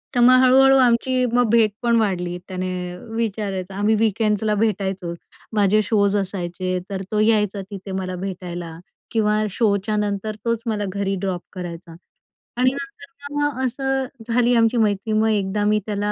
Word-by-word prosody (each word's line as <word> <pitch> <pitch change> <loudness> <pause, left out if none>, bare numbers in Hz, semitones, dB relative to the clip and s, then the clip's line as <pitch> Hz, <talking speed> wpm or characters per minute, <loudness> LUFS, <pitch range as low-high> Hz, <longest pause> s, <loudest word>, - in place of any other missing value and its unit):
तर - - +2
मग 250 +1 +7
हळू-हळू 270 +1 +6
आमची 255 +1 +3
मग 245 -2 +3
भेटपण 230 +1 +2
वाढली, 180 -4 -1
त्याने 185 -1 -3 0.5
विचारायचं. 200 -4 -3
आम्ही 205 +3 +2
वीकेंड्स 215 -1 +1
ला 215 -1 +1
भेटायचो, 195 -4 -1 0.4
माझे 210 0 +3
शोज 205 -1 +2
असायचे, 185 -1 -3
तर 195 -1 -4
तो 210 - +1
यायचा 210 -2 +2
तिथे 195 -1 -8
मला 185 -1 -3
भेटायला 175 -3 -6 0.3
किंवा 215 -2 +2
शो 210 0 +2
च्यानंतर, 210 0 -1
तोच 230 -1 0
मला 215 -3 -1
घरी 200 -1 -1
ड्रॉप 185 -2 -2
करायचा 170 -2 -7 0.6
आणि 255 +1 +3
नंतर 280 +1 -9
मग 290 -2 0
असं 270 +1 -1 0.2
झाली 240 +1 +2
आमची 230 +1 +3
मैत्री. 215 -1 +1
मग, 215 +1 +3
एकदा 205 -1 0
मी 210 0 +3
त्याला 205 -1 -1
210 Hz, 155 wpm, -22 LUFS, 190-230 Hz, 0.6 s, मग